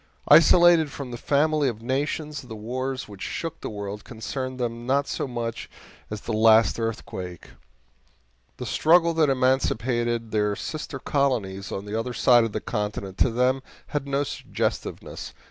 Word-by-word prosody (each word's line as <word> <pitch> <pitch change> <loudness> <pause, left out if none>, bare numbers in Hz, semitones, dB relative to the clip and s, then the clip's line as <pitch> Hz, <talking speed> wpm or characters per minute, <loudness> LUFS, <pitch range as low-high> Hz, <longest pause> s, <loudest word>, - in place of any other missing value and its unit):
Isolated 165 +1 +7
from 135 -2 -7
the - - -4
family 145 +3 +2
of 115 -3 -4
nations, 145 +3 -2
the 120 -3 -9
wars 130 +4 -4
which 100 -2 -12
shook 165 -1 -4
the - - -4
world 100 -1 -6
concerned 130 +2 -5
them 120 0 -3
not 140 +2 +2
so - - -2
much 115 -2 -4 0.4
as 105 -1 -5
the 115 - -4
last 110 -1 +5
earthquake; 110 -6 -5 1.1
the - - -5
struggle 170 +1 +4
that 160 -3 +3
emancipated 120 -3 +1
their 105 -1 +1
sister 150 +1 -5
colonies 115 -9 -1
on 100 - -4
the 105 - -7
other 115 +3 -2
side 120 -1 +5
of 115 - -2
the 110 - -2
continent 105 -2 -4
to - - +4
them 125 +3 +1 0.3
had 145 -2 -2
no 140 +1 +1
suggestiveness. - - -4
125 Hz, 155 wpm, -25 LUFS, 110-140 Hz, 1.1 s, Isolated